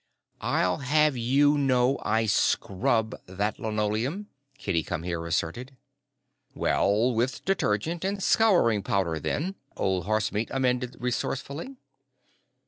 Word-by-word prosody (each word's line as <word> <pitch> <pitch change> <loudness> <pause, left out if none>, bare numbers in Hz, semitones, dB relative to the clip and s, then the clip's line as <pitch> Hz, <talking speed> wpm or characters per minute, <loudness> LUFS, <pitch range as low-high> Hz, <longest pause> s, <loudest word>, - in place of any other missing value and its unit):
"I'll 90 0 +1
have 150 +1 +2
you 140 +5 +3
know 130 -1 +2
I 110 +1 +1
scrub 110 +1 +1
that 100 +4 -2
linoleum," 110 - -2 0.3
Kitty 90 -9 -1
Come 80 0 -4
Here 85 -1 -3
asserted. 120 - -3 0.8
"Well, 110 +5 +2
with 120 +2 -1
detergent 165 - 0
and 195 0 -2
scouring 175 - +4
powder, 90 -4 -1
then," 165 - -2 0.2
Old 95 -1 0
Horsemeat 110 +1 0
amended 125 -2 0
resourcefully. 135 - -3
120 Hz, 110 wpm, -27 LUFS, 105-140 Hz, 0.8 s, scouring